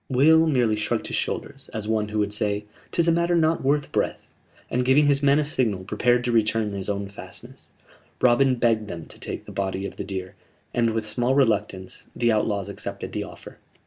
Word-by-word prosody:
Will 160 +5 +5
merely 125 -7 +2
shrugged 105 +2 -1
his - - -3
shoulders, 135 -1 -4
as 105 -1 -3
one 110 -1 0
who 105 - -3
would 105 -1 0
say: 105 0 -1 0.3
"'Tis 170 -1 +2
a - - +5
matter 170 +1 +2
not 165 0 +2
worth 145 +2 +1
breath"; - - -1 0.4
and, 125 - 0
giving 135 +4 +4
his 140 -1 +3
men 140 0 +4
a 150 - +1
signal, 115 -10 0
prepared 120 +5 +1
to 120 - 0
return 110 -1 +2
to 100 - -4
his 95 +1 -4
own 100 0 -2
fastnesses. 100 - -12 0.5
Robin 125 +2 +4
begged 115 -3 +1
them 85 -4 -7
to - - -15
take - - -6
the - - -9
body 95 0 -2
of - - -7
the - - -3
deer, 95 -2 -5 0.4
and, 115 -1 +2
with 110 -1 -2
small 120 +4 0
reluctance, 105 -7 0
the 120 -1 +2
outlaws 105 -2 0
accepted 100 - -6
the - - -3
offer. - - -12
115 Hz, 210 wpm, -24 LUFS, 105-135 Hz, 0.5 s, Will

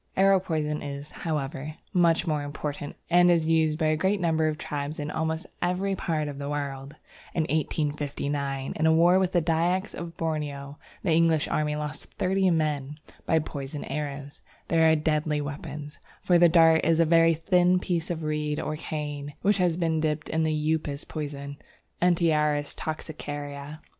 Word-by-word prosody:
Arrow 195 0 +5
poison 155 -4 -2
is, 140 +1 -6
however, 150 -1 -4 0.2
much 170 -2 +3
more 155 -3 0
important, 145 0 -5 0.2
and 175 +1 +6
is 170 -2 +3
used 160 -1 +2
by 160 - 0
a 155 0 +3
great 190 +5 +1
number 160 -3 +2
of 155 -1 -1
tribes 145 0 -4
in 150 0 -3
almost 160 +2 -2 0.2
every 185 +2 0
part 155 -4 -1
of 140 -1 -6
the 140 0 -4
world. 140 -1 -4 0.4
In 165 - +2
1859, 145 -3 -2
in 155 - 0
a - - +5
war 170 +3 +5
with 185 -1 +1
the 175 -3 +2
Dyaks 175 +5 +1
of 170 0 -7
Borneo, 145 -3 -3 0.2
the 175 - +1
English 160 -1 +3
army 150 -1 0
lost 150 0 -5
thirty 190 0 +2
men 150 -3 0 0.3
by 160 - +3
poisoned 145 -2 -5
arrows. 145 -1 -5 0.3
They 165 -1 +3
are 160 0 +6
deadly 155 -1 0
weapons, 145 0 -6 0.2
for 175 -1 +3
the 175 0 +7
dart 165 -1 +5
is 165 0 +3
a 165 - +5
very 165 0 +5
thin 180 +2 +3
piece 175 -2 -2
of 165 -2 -3
reed 150 -1 -1
or 155 - -3
cane, 145 -2 -5
which 200 0 +3
has 175 -2 +2
been 165 -2 +1
dipped 155 0 -1
in 160 - 0
the 160 0 +1 0.2
Upas 145 -2 -3
poison 140 -2 -5 0.4
(Antiaris 155 -4 +2
toxicaria). 145 -1 -6
155 Hz, 170 wpm, -27 LUFS, 145-165 Hz, 0.4 s, the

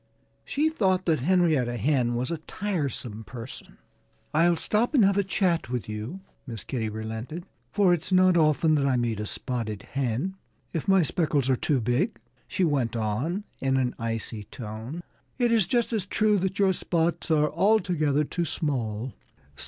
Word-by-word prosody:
She 300 +2 +1
thought 190 -12 +1
that 160 -4 +2
Henrietta 155 -6 +2
Hen 120 -1 +1
was 125 +4 -1
a 165 - -2
tiresome 145 - -3
person. 120 +2 -9 0.6
"Ill 170 +3 +4
stop 225 - 0
and 230 -7 +6
have 195 0 +3
a 200 - +3
chat 180 - 0
with 125 -2 -3
you," 110 - -5 0.3
Miss 115 -6 -6
Kitty 115 -4 -2
relented, 110 - -5 0.3
"for 195 -3 +4
it's 175 +2 -2
not 185 -1 +5
often 155 0 +4
that 140 -2 +2
I 130 -2 +2
meet 115 -3 -1
a 105 - -3
spotted 110 -5 -4
hen. 135 +7 -1 0.4
If 165 - -3
my 190 -2 +5
speckles 150 -5 +1
are - - +4
too 140 +2 +1
big," 125 - 0 0.3
she 190 -1 -1
went 135 -8 +1
on 125 - -1 0.2
in 135 0 +1
an 125 -2 +1
icy 115 -2 -4
tone, 115 +9 -7 0.3
"it 240 -2 +2
is 220 -6 +3
just 240 +1 +1
as 205 -4 -1
true 215 0 +2
that 190 +1 -2
your 195 -2 +4
spots 170 -1 -1
are 150 -2 +3
altogether 165 -6 +2
too 170 +3 -2
small." 125 -7 -2
150 Hz, 170 wpm, -27 LUFS, 120-185 Hz, 0.6 s, and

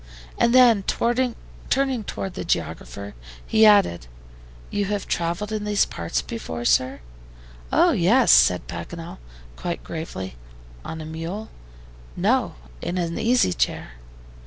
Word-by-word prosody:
And 235 - +4
then, 240 -4 +6 0.9
turning 265 -3 +1
toward 195 -1 -5
the - - -5
geographer, 100 +1 -3 0.3
he 220 0 +5
added: 195 - +4 0.6
"You 205 0 0
have 205 0 -3
traveled 175 +5 -2
in 215 -1 -2
these 210 -1 +2
parts 85 0 -3
before, 120 +1 -6
sir?" 130 - +2 0.7
"Oh, 350 - +5
yes," 230 - +4
said 90 -1 +5
Paganel, 165 - -7 0.4
quite 175 -1 -4
gravely. 95 - -6 0.5
"On 160 0 -6
a - - -7
mule?" 165 +7 -6 0.7
"No, - - +1 0.3
in 180 - -3
an 170 -1 -2
easy 235 - +3
chair." - - -1
180 Hz, 125 wpm, -23 LUFS, 155-215 Hz, 0.9 s, then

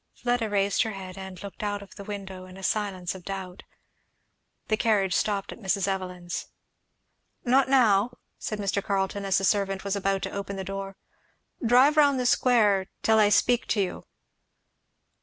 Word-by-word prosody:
Fleda 245 -2 0
raised 200 -1 +2
her 220 -3 -1
head 185 -2 -8
and 190 -1 -9
looked 200 - -8
out 205 -1 -2
of 195 - -15
the 200 - -9
window 195 -2 -7
in 185 0 -12
a 195 - -11
silence 190 -3 -1
of 190 -2 -11
doubt. 190 -1 -6 1.1
The 215 - +2
carriage 205 -4 +2
stopped 200 -1 0
at - - -10
Mrs. 195 -2 0
Evelyn's. 180 -2 -4 1.0
"Not 260 +1 +4
now," 240 -3 +3 0.2
said 215 - -3
Mr. 200 -1 -1
Carleton, 200 0 -1
as 195 0 +2
the 195 - -1
servant 195 -1 +1
was 200 0 -1
about 195 -1 0
to - - -3
open 200 0 -5
the 190 - -4
door; 195 +1 -6 0.7
"drive 255 +6 +5
round 285 -3 +5
the 250 - -1
square 215 -7 +3 0.2
till 220 0 +4
I 210 -1 +5
speak 240 +3 +3
to 210 - 0
you." 190 -2 -2
200 Hz, 175 wpm, -27 LUFS, 190-220 Hz, 1.1 s, drive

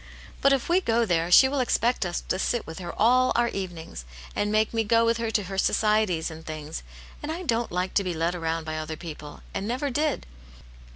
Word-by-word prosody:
But 275 - +5
if 275 -2 +1
we 355 +2 +3
go 230 -5 +2
there, 170 -3 +1
she 265 +9 +8
will 280 +1 -1
expect 240 -4 +1
us 175 - -3
to 185 - -2
sit 240 +3 0
with 160 +2 -8
her 175 -2 -5
all 255 +3 +4
our 235 0 +3
evenings, 175 - -6 0.3
and 205 0 0
make 215 +1 +2
me 225 -1 +1
go 230 +2 +3
with 230 0 +2
her 230 -1 -2
to 215 -2 0
her 195 +1 -4
societies 210 -7 +2
and 160 0 -10
things. 155 0 -6 0.4
And 300 - -4
I 345 +3 -4
don't 235 -6 0
like 180 +1 -1
to 200 - +2
be 180 -2 -3
led 165 +2 0
round 165 -2 -2
by 155 0 -3
other 155 0 -5
people, 150 -3 -9
and 195 - -3
never 260 +4 -1
did." 300 +3 0
205 Hz, 225 wpm, -26 LUFS, 165-235 Hz, 0.4 s, she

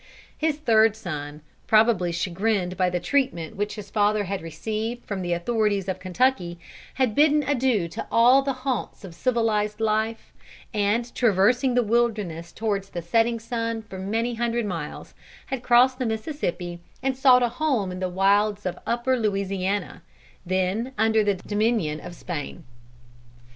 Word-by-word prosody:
His 310 -1 0
third 225 -6 +4
son, 150 -7 -6 0.3
probably 215 -5 +4
chagrined 180 +2 -1
by 185 0 +2
the 180 0 -1
treatment 180 - -1
which 205 +1 -2
his 210 -2 -9
father 210 0 +2
had 195 0 -3
received 215 +9 -4
from 200 -2 -4
the 175 -1 -3
authorities 205 +1 0
of 190 -1 -3
Kentucky, 185 -3 0 0.4
had 255 -4 +1
bidden 300 +3 +4
adieu 255 -9 +1
to 165 - -6
all 245 +4 +6
the 275 0 -1
haunts 255 -6 -2
of 185 -3 -9
civilized 215 -2 0
life, 220 +1 -1 0.4
and 215 +3 0
traversing 245 +4 +3
the 245 - +4
wilderness 210 -8 0
towards 200 -3 -2
the 175 - -5
setting 230 +6 +2
sun 230 -1 -3
for 195 -3 -9
many 225 +5 -1
hundred 235 0 -1
miles, 170 -6 -6 0.3
had 265 -3 -4
crossed 250 +2 +4
the 255 - 0
Mississippi 195 - -3 0.2
and 270 0 0
sought 255 -1 +5
a 240 - +2
home 245 -7 -1
in 180 - -6
the 185 -1 -1
wilds 200 +2 +2
of 180 - -1
the - - -17
upper 240 +2 +1
Louisiana, 195 - -1 0.4
then 190 +7 -1
under 220 0 +3
the 205 -1 +1
dominion 205 -5 0
of 175 +1 -9
Spain. 165 0 -6
215 Hz, 155 wpm, -25 LUFS, 185-240 Hz, 0.4 s, all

